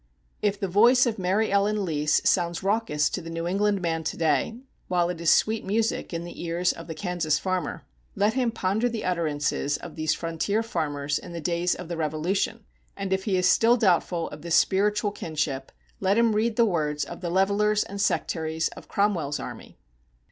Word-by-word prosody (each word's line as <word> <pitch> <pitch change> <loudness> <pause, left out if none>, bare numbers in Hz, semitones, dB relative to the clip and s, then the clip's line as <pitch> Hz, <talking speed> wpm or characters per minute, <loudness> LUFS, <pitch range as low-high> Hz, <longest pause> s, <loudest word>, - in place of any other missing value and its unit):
If 205 -1 0
the 195 - -1
voice 235 +7 +5
of 230 -3 -2
Mary 195 +4 +1
Ellen 200 0 +2
Lease 150 -2 +1
sounds 175 -1 +1
raucous 195 -7 +1
to 185 - -3
the 165 - -8
New 165 0 -4
England 200 +1 +1
man 165 -1 -1
to 150 - -3
day, 160 - +1 0.3
while 175 -1 +1
it 175 -2 -4
is 170 - +2
sweet 220 0 +2
music 220 +3 -1
in 165 -1 -3
the 175 0 -8
ears 175 +1 +1
of 165 - -10
the 160 - -6
Kansas 170 -3 0
farmer, 185 -4 -3 0.3
let 210 +2 +2
him 255 -2 +1
ponder 220 +2 0
the 230 -2 -4
utterances 150 -4 0
of 175 - -10
these 155 -1 0
frontier 170 +6 -1
farmers 150 -7 -2
in 175 - -10
the 170 - -4
days 170 +2 0
of 180 - -8
the 170 0 -4
Revolution; 165 +8 -1 0.3
and 195 -1 -2
if 190 0 -1
he 195 -3 +1
is 180 0 +3
still 230 +6 +5
doubtful 175 -5 +2
of 150 - -10
this 170 0 0
spiritual 205 +2 +2
kinship, 150 -7 -3 0.3
let 195 +2 +2
him 230 -1 +4
read 220 +1 +1
the 235 - +4
words 150 -7 0
of 175 - -9
the 175 - -3
levelers 205 +3 +2
and 200 0 -6
sectaries 160 -5 0
of - - -12
Cromwell's 175 -8 0
army. - - -9
180 Hz, 195 wpm, -26 LUFS, 165-205 Hz, 0.3 s, voice